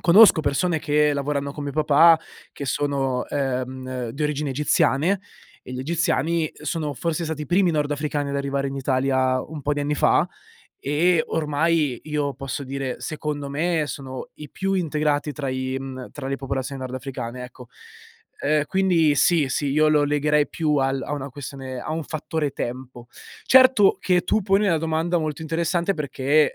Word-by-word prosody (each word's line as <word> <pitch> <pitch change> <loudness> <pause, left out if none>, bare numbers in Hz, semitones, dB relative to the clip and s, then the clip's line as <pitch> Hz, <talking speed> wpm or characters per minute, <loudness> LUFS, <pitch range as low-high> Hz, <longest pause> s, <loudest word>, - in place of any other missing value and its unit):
conosco 190 0 +7
persone 160 +3 0
che 150 0 +2
lavorano 140 0 -2
con 145 - -7
mio 140 - -4
papà, 155 +2 +6 0.3
che 140 - -6
sono, 135 -3 0
ehm, 130 -2 -3
di 140 +6 -5
origini 150 0 -1
egiziane, 150 +5 +2 0.4
e - - -9
gli 125 - -5
egiziani 165 +2 0
sono 155 -1 -2
forse 165 +4 -2
stati 155 -1 -4
i - - -7
primi 180 0 +3
nordafricani 145 -1 -1
ad 140 - -2
arrivare 140 0 -1
in 135 - -4
Italia 130 -1 +1
un 150 0 -8
po' 145 - 0
di 145 - -2
anni 145 +1 0
fa. - - +3 0.6
E 160 +4 +3
ormai 150 -3 +1
io 150 -2 -2
posso 135 +1 -5
dire, 135 -1 -4
secondo 150 -2 -4
me, 160 +3 0
sono 130 -3 -7
i 150 -2 -11
più 195 0 -2
integrati 150 -4 0
tra 140 -2 -4
i 130 0 -2
mhmm, 130 -1 -7
tra 135 -2 -6
le 135 - -1
popolazioni 135 0 -4
nordafricane, 130 -1 -5
ecco. 125 -1 -12 0.7
Ehm, 150 0 +2
quindi 175 -4 +3
sì, 150 0 +3
sì, 140 +2 -1
io 155 +2 +3
lo 150 -1 +4
legherei 150 0 +2
più 155 -3 0
al 135 -1 +1
a - - -5
una 140 -1 -4
questione 130 -1 -7
a 155 - -5
un 160 0 -3
fattore 155 -1 -3
tempo. 125 -1 -6 0.4
Certo 255 -7 +6
che 180 -1 +2
tu 215 - +1
poni 195 +2 +2
una 170 -4 +3
domanda 165 +2 0
molto 155 -1 -3
interessante 170 +3 0
perché, 145 0 +1
145 Hz, 170 wpm, -23 LUFS, 135-160 Hz, 0.7 s, conosco